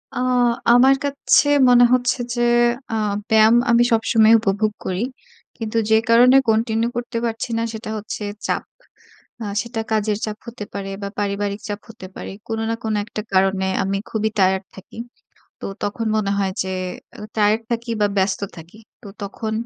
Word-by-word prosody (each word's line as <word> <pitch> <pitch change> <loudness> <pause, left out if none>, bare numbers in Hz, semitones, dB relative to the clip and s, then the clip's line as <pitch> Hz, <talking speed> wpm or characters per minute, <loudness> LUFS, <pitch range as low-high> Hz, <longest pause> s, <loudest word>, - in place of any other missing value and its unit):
আ - - -4 0.6
আমার 265 +3 +6
কাছে 285 +1 +2 0.2
মনে 245 0 +7
হচ্ছে 245 0 +1 0.2
যে, 240 - -1 0.5
আ - - 0 0.3
ব্যায়াম 220 +1 +6 0.2
আমি 235 0 +5
সবসময়ই 225 0 +4
উপভোগ 210 0 0
করি। 185 +3 -2 0.5
কিন্তু 225 0 -3
যে 220 - +5
কারণে 245 +3 +6
continue 225 +1 +1
করতে 240 -1 -4
পারছি 230 +1 -3
না, 230 - 0
সেটা 220 0 -7
হচ্ছে 210 0 -6 0.2
চাপ। - - -1 0.8
আ - - -4 0.2
সেটা 235 -1 -4
কাজের 215 -1 +1
চাপ 215 -1 -5
হতে 235 -2 -7
পারে 195 -1 -5
বা, 200 - -3
পারিবারিক 200 0 -2
চাপ 205 0 -4
হতে 220 -4 -10
পারে। - - -7 0.2
কোন 225 -1 -3
না 230 - 0
কোন 220 -1 -1
একটা 215 - -5
কারণে 190 0 +2 0.2
আমি 195 +1 -1
খুবই 220 0 -1
টায়ার্ড 190 0 +3
থাকি। 190 +2 -13 0.6
তো - - -8 0.2
তখন 220 +2 -2
মনে 200 -2 0
হয় 195 -1 0
যে 190 - -6 0.5
আ - - -9 0.2
টায়ার্ড 215 +1 +3
থাকি 235 0 -3
বা, 205 - +4
ব্যস্ত 190 0 +1 0.2
থাকি। 170 +6 -13 0.2
তো 210 - -10
তখন 220 +2 -5
220 Hz, 170 wpm, -21 LUFS, 200-230 Hz, 0.8 s, মনে